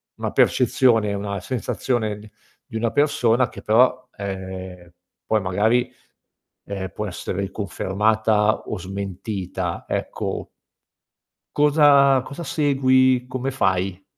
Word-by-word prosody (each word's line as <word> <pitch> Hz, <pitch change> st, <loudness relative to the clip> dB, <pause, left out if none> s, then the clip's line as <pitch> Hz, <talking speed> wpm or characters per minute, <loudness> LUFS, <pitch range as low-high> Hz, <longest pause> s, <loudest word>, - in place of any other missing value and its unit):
una -, -, -4 dB
percezione, 115 Hz, -5 st, +3 dB
una 100 Hz, 0 st, -3 dB
sensazione 110 Hz, 0 st, -2 dB
d 105 Hz, 0 st, -14 dB, 0.4 s
di 120 Hz, -, -12 dB
una 115 Hz, 0 st, 0 dB
persona 130 Hz, -5 st, +2 dB
che -, -, -11 dB
però, 125 Hz, +3 st, +3 dB
ehm, 95 Hz, -3 st, -7 dB, 0.3 s
poi 110 Hz, -1 st, +1 dB
magari, 105 Hz, +6 st, +1 dB, 0.7 s
ehm, 95 Hz, -2 st, -5 dB
può 105 Hz, -, -4 dB
essere 95 Hz, +1 st, -4 dB
riconfermata 105 Hz, +2 st, +1 dB
o -, -, -4 dB
smentita, 95 Hz, -1 st, -5 dB
ecco -, -, -3 dB, 1.1 s
cosa 145 Hz, -3 st, +5 dB
cosa 160 Hz, +4 st, -7 dB
segui? 130 Hz, -4 st, +2 dB
Come 130 Hz, +1 st, -3 dB
fai? 95 Hz, -5 st, 0 dB
110 Hz, 105 wpm, -22 LUFS, 95-130 Hz, 1.1 s, cosa